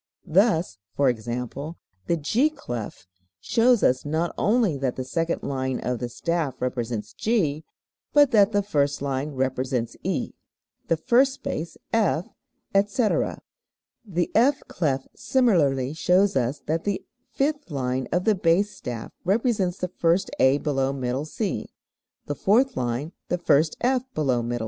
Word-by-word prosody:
Thus, 175 - +2 0.2
e.g., 125 -5 +3
the 125 - -5
G 230 - +2
clef 120 - -7 0.3
shows 235 - +3
us 130 +1 +3
not 160 +3 -1
only 215 -6 +2
that 130 -2 -1
the 130 - -3
second 165 +6 -2
line 130 -2 -2
of 125 0 -2
the 120 - -3
staff 160 +1 -2
represents 120 -3 -3
G, 165 -10 0 0.5
but 290 -2 +5
that 210 -3 +5
the 205 -1 +1
first 145 -8 0
line 140 +1 -1
represents 130 -2 -1
E, - - -2 0.5
the 165 - +2
first 260 - +3
space 165 - -5 0.2
F, 200 -6 +2 0.5
etc. 205 +3 +1 0.6
The 175 -6 -2
F 260 +5 +4
clef 135 -6 -1
similarly 150 - +2
shows 180 +4 +3
us 130 +2 0
that 160 +2 -1
the 205 -2 -2 0.3
fifth 290 -1 -1
line 130 -3 -2
of 180 +1 +1
the 215 - +4
bass 185 +2 +2
staff 120 -10 -6
represents 200 -2 +1
the 180 - -2
first 170 +1 +1
A 130 +2 +5
below 135 -3 0
middle 130 +1 -2
C, 195 +5 -3 0.6
the 145 - -2
fourth 240 - +2
line 125 +6 -2 0.2
the 180 - +1
first 155 -2 +2
F 255 +1 +2
below 130 -6 +1
middle 115 - -4
C, 120 - -1
etc. - - -3
160 Hz, 150 wpm, -25 LUFS, 130-205 Hz, 0.6 s, but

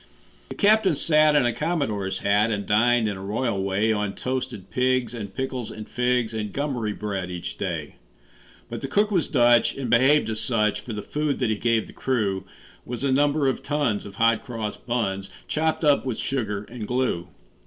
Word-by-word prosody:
The - - -6
captain 205 -4 +4
sat 155 +1 +4
in 145 -4 +4
a 120 - +1
commodore's 135 - -2
hat 105 +3 +3
And 100 -2 -2
dined, 115 +3 +3
in 100 -2 -3
a 95 - -8
royal 105 0 -1
way, 100 +3 +1
On 105 -2 -2
toasted 125 -7 -4
pigs 125 -2 +1
and 105 -4 -6
pickles 130 -1 -4
and 110 -1 -8
figs 125 -2 0
And 105 -2 -3
gummery 130 -6 -2
bread, 100 -3 -3
each 90 -1 -5
day. - - -4 0.7
But - - -6
the - - -3
cook 210 +1 +2
was 180 -5 +1
Dutch, 120 -3 +4
and 130 -4 -4
behaved 135 +5 +5
as 110 - -3
such; 105 -4 +1
For 115 +2 -7
the 105 -1 -5
food 150 -1 -1
that 125 -4 0
he - - +1
gave 115 +1 +1
the - - -13
crew 100 -7 -1 0.4
Was 120 +1 -6
a 140 - +2
number 145 +1 +3
of 130 - 0
tons 145 -8 0
of 100 - -11
hot 115 +1 +3
cross 110 -4 -4
buns, 100 -5 -2 0.2
Chopped 160 +1 0
up 145 -2 +4
with 130 -4 -3
sugar 105 -7 -2
and 110 0 -7
glue. 125 -9 -1
120 Hz, 195 wpm, -24 LUFS, 105-135 Hz, 0.7 s, behaved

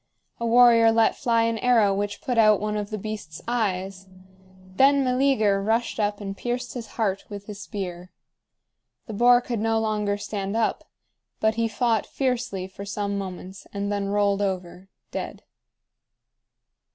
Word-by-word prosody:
A 235 - -1
warrior 230 -1 +6
let 225 0 +3
fly 230 -1 +1
an 230 -1 0
arrow 225 -5 +4
which 205 +1 -3
put 250 -5 0
out 215 -2 +5
one 210 0 -2
of 205 -1 -3
the 215 - -4
beast's 205 -7 -6
eyes. 195 -5 -2 0.7
Then 275 +1 +5
Meleager 250 -6 +2
rushed 225 +3 0
up 205 -1 0
and 195 -1 -5
pierced 245 +3 -4
his 235 -3 -6
heart 200 -4 -1
with 205 -1 -8
his 210 -1 -8
spear. 180 -3 -6 1.0
The 220 - -7
boar 245 +3 +5
could 240 -2 -3
no 225 +1 +1
longer 210 -2 -1
stand 205 0 -4
up; 225 - 0 0.5
but 220 0 +2
he 230 0 0
fought 225 0 0
fiercely 245 -8 -2
for 190 +1 -10
some 200 0 -3
moments, 190 -1 -7
and 200 0 -2
then 200 -1 -1
rolled 205 0 +1
over, 185 -1 -4 0.2
dead. - - -6
210 Hz, 155 wpm, -25 LUFS, 200-230 Hz, 1.0 s, warrior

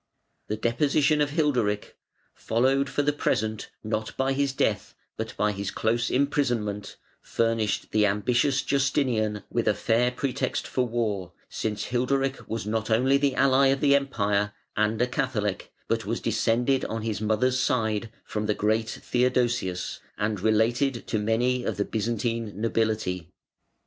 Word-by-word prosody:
The 105 - -2
deposition 145 +6 +2
of 145 - +2
Hilderic, 125 -10 0 0.4
followed 135 +4 +1
for 145 - 0
the 145 +1 +2
present 110 -6 -1
not 110 0 -3
by 135 0 +1
his 140 0 +1
death 135 - -1 0.2
but - - -5
by 105 0 +2
his 100 -1 -4
close 115 +2 0
imprisonment, 120 -7 0 0.3
furnished 115 -2 -1
the 105 -1 +4
ambitious 120 +7 +1
Justinian 125 -7 +1
with - - 0
a - - +3
fair 120 +2 +2
pretext 125 +1 -2
for 125 -1 0
war, 105 -6 -2 0.2
since 105 -1 -3
Hilderic 135 +2 0
was 110 -2 -3
not 110 +1 -2
only 130 +5 +4
the 140 -2 +1
ally 135 0 +4
of 135 0 +2
the 140 0 +4
Empire, 105 -7 0 0.2
and 105 +1 +1
a - - +4
Catholic, 105 -6 -2 0.2
but - - 0
was - - -1
descended 125 +4 +1
on 110 -1 -4
his 110 -2 -2
mother's 110 +4 +1
side 110 -3 0
from 105 0 -3
the 105 - +1
great 110 +1 +1
Theodosius 120 -7 0 0.2
and 105 -1 -1
related 115 +5 +1
to 110 - 0
many 120 +4 +1
of - - -2
the 100 - 0
Byzantine 115 -1 -2
nobility. 110 -6 -1
115 Hz, 150 wpm, -26 LUFS, 105-130 Hz, 0.4 s, the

